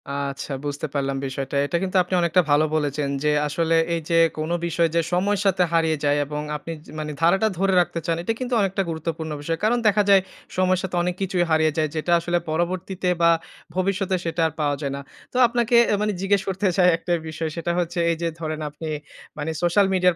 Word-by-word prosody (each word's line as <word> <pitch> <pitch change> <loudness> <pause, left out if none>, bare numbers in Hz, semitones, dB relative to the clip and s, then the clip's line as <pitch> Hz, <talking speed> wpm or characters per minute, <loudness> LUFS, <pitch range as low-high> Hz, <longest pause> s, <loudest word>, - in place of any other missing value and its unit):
আচ্ছা, 140 0 -4
বুঝতে 145 +2 -3
পারলাম 135 -1 -1
বিষয়টা। 135 +1 -4
এটা 170 +4 0
কিন্তু 190 0 0
আপনি 180 - -7
অনেকটা 170 +2 +3
ভালো 145 +2 +5
বলেছেন 145 -2 -1
যে 150 - +3 0.2
আসলে 165 +2 +1 0.2
এই 165 - -2
যে 165 - +3 0.2
কোন 155 +2 -3 0.2
বিষয় 170 0 +2
যে 170 - +4
সময়ের 200 +3 +1
সাথে 185 -2 +3
হারিয়ে 160 -1 +2
যায়। 145 0 +3
এবং 150 +1 -4 0.2
আপনি 165 +2 -8
যে - - -13
মানে 150 0 -4
ধারাটা 195 +6 +4
ধরে 195 0 +2
রাখতে 175 -1 -2
চান 165 - +1
এটা 225 - 0
কিন্তু 255 0 -3
অনেকটা 195 0 0
গুরুত্বপূর্ণ 160 0 -4
বিষয়। 165 +2 -2
কারণ 235 +3 +3
দেখা 210 0 +4
যায় 195 -1 +7 0.4
সময়ের 185 0 +3
সাথে 185 -1 -3
অনেক 180 0 -1
কিছুই 185 -2 +1
হারিয়ে 155 0 +3
যায়। 155 -1 +1
যেটা 160 +2 -1
আসলে 175 +1 0
পরবর্তীতে 180 +3 -1
বা 170 0 +6 0.4
ভবিষ্যতে 190 0 0
সেটা 165 0 -2
আর 160 - -7
পাওয়া 145 -1 +1
যায় 140 -2 -2
না। 140 - -6 0.3
তো - - -2
আপনাকে 240 0 +1 0.2
আ - - +4
মানে 210 0 +1
জিজ্ঞেস 195 0 +2
করতে 195 +1 0
চাই 180 - +5
একটা 175 +1 -2 0.2
বিষয়, 160 0 -3
সেটা 170 0 -2
হচ্ছে 175 0 -2
এই - - 0
যে 170 - 0
ধরেন 155 -1 -3
আপনি 155 +2 -7 0.5
মানে 150 +2 -2
সোশ্যাল 175 +4 +3
মিডিয়ার 180 -2 +3
170 Hz, 210 wpm, -23 LUFS, 155-185 Hz, 0.5 s, যায়